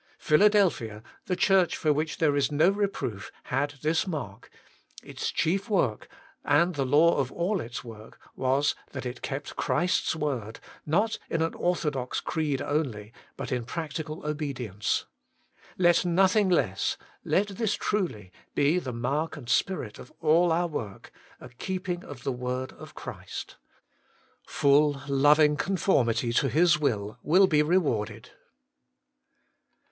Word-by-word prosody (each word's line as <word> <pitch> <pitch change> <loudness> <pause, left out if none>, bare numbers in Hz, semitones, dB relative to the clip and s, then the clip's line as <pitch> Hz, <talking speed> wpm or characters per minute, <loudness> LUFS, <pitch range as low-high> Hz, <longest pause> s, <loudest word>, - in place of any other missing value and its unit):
Philadelphia, 155 - +3 0.2
the 180 - 0
church 190 -2 +3
for 155 -2 +2
which 155 +2 -2
there 150 -3 +2
is 140 0 +1
no 155 +6 +4
reproof, 195 - -3
had 145 +3 -1
this 160 +4 +1
mark: 140 - -6 0.5
its - - -4
chief 195 +7 0
work, 130 - 0 0.4
and 170 +5 +3
the 135 -4 -1
law 155 +5 +5
of 135 -3 -1
all 180 +2 -1
its 120 +1 -6
work, 110 -2 -12 0.2
was, 135 +2 +1 0.2
it 130 -2 -5
kept 140 +1 -5
Christ's 175 -1 +1
zvord, 130 -8 -3 0.3
not 205 +9 +1
in 165 -1 0
an 165 - 0
ortho 175 -3 0
dox 130 -3 -3
creed 150 -4 -2
only, 120 -8 -2 0.2
but - - -5
in 125 -2 -1
practical 155 +2 -5
obedience. 135 -9 -2 0.7
Let 175 -2 +4
nothing 190 +3 +3
less, 95 - +1 0.3
let 205 +2 +1
this 205 +2 -1
truly, 125 - -2 0.2
be 150 +6 +3
the 130 -7 -5
mark 145 +7 -2
and 130 -5 -10
spirit 130 - 0
of - - -12
all 165 +2 +4
our 170 +2 +2
work: 115 - -6 0.3
a - - -11
keeping 180 +7 -4
of 125 -3 -10
the 135 - -1
word 125 +1 -3
of - - -13
Christ. - - -8 0.9
Full, 145 -1 +3
loving 150 +2 +4
conform 180 -10 +2
ity 115 +1 0
to 135 +3 +2
His 170 0 +4
will 110 -6 -1
will 185 +5 +5
be 155 -5 +3
rewarded. 120 - 0
150 Hz, 140 wpm, -27 LUFS, 125-175 Hz, 0.9 s, law